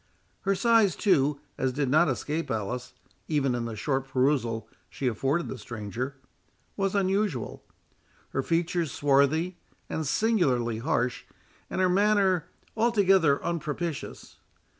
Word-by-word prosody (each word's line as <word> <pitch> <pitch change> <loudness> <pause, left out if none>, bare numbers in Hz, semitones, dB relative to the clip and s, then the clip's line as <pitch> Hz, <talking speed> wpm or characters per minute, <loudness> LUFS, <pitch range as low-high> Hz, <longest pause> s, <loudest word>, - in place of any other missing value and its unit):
Her 195 0 +1
size, 225 -2 +4
too, 150 -8 +2 0.2
as 130 -1 +1
did 140 +1 0
not 155 +5 +4
escape 150 +5 -2
Alice, 125 +4 -3 0.3
even 140 -5 +1
in 120 -1 -2
the 115 -1 -5
short 135 +4 -1
perusal 125 -5 0 0.2
she 135 - -5
afforded 135 +8 0
the 130 - -6
stranger, 120 +5 -5 0.6
was 195 0 -1
unusual; 195 - 0 0.7
her 135 - -1
features 170 +1 0
swarthy 145 +5 +2 0.3
and 160 -2 -2
singularly 135 - +1
harsh, 125 +1 -1 0.4
and - - -3
her 185 - +4
manner 190 -2 +2 0.3
altogether 195 -10 +3
unpropitious. 165 -1 -4
150 Hz, 120 wpm, -27 LUFS, 125-185 Hz, 0.7 s, size